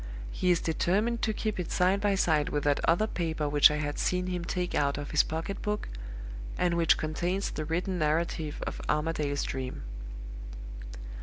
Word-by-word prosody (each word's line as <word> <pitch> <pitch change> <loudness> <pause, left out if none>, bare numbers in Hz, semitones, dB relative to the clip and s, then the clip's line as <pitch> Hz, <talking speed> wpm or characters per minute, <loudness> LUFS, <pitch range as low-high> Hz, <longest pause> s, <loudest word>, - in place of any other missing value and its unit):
He 185 - 0
is 175 -2 +5
determined 205 +8 +1
to 220 - +2
keep 215 -1 -2
it 175 - -3
side 185 +2 +3
by 205 -1 +3
side 155 -6 +3
with 145 -1 -1
that 145 -1 +3
other 175 +6 +4
paper 160 -7 -1
which 145 0 +7
I 150 - -1
had 145 -1 -2
seen 180 0 +1
him 180 -1 -2
take 180 +1 -2
out 140 -1 +2
of 145 0 -5
his 150 - +6
pocket 165 +5 -3
book, 210 0 -2 0.7
and 175 -1 +2
which 170 -1 +4
contains 175 +5 -1
the 155 - -3
written 175 +3 -1
narrative 155 0 0
of - - -4
Armadale's 150 -2 0
Dream. 130 - -4
165 Hz, 175 wpm, -30 LUFS, 150-185 Hz, 0.7 s, which